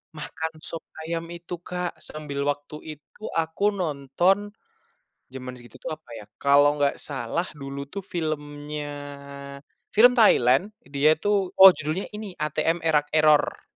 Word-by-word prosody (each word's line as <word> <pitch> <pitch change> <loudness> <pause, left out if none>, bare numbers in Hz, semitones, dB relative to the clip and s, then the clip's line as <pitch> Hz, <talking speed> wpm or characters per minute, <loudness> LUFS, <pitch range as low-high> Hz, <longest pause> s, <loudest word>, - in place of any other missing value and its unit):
makan 160 +1 -5
sop 165 - -6 0.2
ayam 165 0 -3
itu 175 +1 -7
Kak 180 0 -4
sambil 150 -2 -6
waktu 145 +1 -3 0.2
itu 150 +8 -29
aku 165 +6 +1
nonton, 175 +6 0 0.8
jaman 130 -1 -7
segitu 120 -2 -16
tuh - - -4
apa - - -23
ya 105 - -10
kalau 145 +1 +4
nggak 140 -1 +1
salah 140 +5 -3
dulu 140 -1 -6
tuh 200 0 -5
filmnya 150 -4 -4 1.1
film 245 +3 +7
Thailand 180 - +5 0.2
dia 145 +3 +3
tuh 200 -1 +1
oh 190 0 +12
judulnya 155 +6 -3
ini 210 -2 -6
ATM: 155 +2 0
Er 160 -1 +1
Rak 145 0 +3
Error. 155 -1 +3
155 Hz, 140 wpm, -25 LUFS, 145-180 Hz, 1.1 s, oh